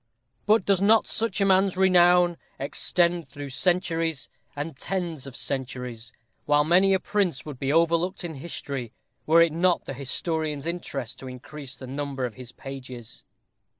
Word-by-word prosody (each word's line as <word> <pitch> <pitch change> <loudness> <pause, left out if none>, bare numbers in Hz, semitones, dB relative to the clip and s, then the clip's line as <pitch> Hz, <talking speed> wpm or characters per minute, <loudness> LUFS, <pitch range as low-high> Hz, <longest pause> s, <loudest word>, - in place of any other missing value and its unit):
But 215 -2 +4
does 195 -2 +3
not 215 +2 +5
such 230 -1 0
a 195 - +3
man's 190 -1 +3
renown 180 -2 +5 0.2
extend 170 +4 0
through 145 -1 -7
centuries 165 0 0 0.3
and 145 +1 -4
tens 170 -3 -3
of 130 - -9
centuries, 125 -4 -4 0.4
while 145 0 +4
many 185 +5 +5
a - - +1
prince 180 -9 0
would 145 -4 -8
be 135 0 0
overlooked 170 +4 +2
in 170 -2 -4
history 135 -5 -5 0.3
were 165 +2 +7
it 165 -2 0
not 175 +2 +2
the - - -5
historian's 150 +2 -2
interest 155 -8 -4
to 130 - -8
increase 130 +2 -8
the 130 - -9
number 135 0 -3
of 120 - -5
his 125 +1 -8
pages? 125 - -8
155 Hz, 155 wpm, -26 LUFS, 135-180 Hz, 0.4 s, were